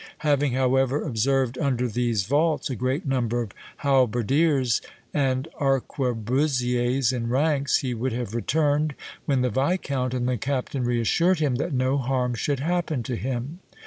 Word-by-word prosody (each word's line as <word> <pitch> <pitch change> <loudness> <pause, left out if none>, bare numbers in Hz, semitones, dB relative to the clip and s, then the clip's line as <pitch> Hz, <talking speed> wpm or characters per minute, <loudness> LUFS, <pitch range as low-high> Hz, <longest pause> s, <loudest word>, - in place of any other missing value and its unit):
Having, 145 -3 +2
however, 130 +2 +2
observed 130 0 0
under 125 -3 +1
these 115 -2 0
vaults 150 - +1
a - - -2
great 130 - -1
number 120 -3 0
of 105 - -9 0.3
halberdiers 130 0 +2 0.3
and 130 -2 0
arquebusiers 125 -1 0
in 115 -2 -2
ranks, 140 +2 +2
he 130 -2 -2
would 125 +3 -2
have 115 -2 -4
returned, 150 +4 +1 0.3
when 135 -4 +2
the 125 -1 +1
viscount 135 - 0
and 125 -1 -1
the 125 -1 0
captain 130 +1 -2
reassured 125 - +2
him 145 -5 +1
that 150 +5 -2
no 130 +1 +1
harm 125 -1 0
should 135 +4 -1
happen 165 -5 -1
to 125 - -3
him. 130 +7 -4
130 Hz, 145 wpm, -25 LUFS, 125-140 Hz, 0.3 s, Having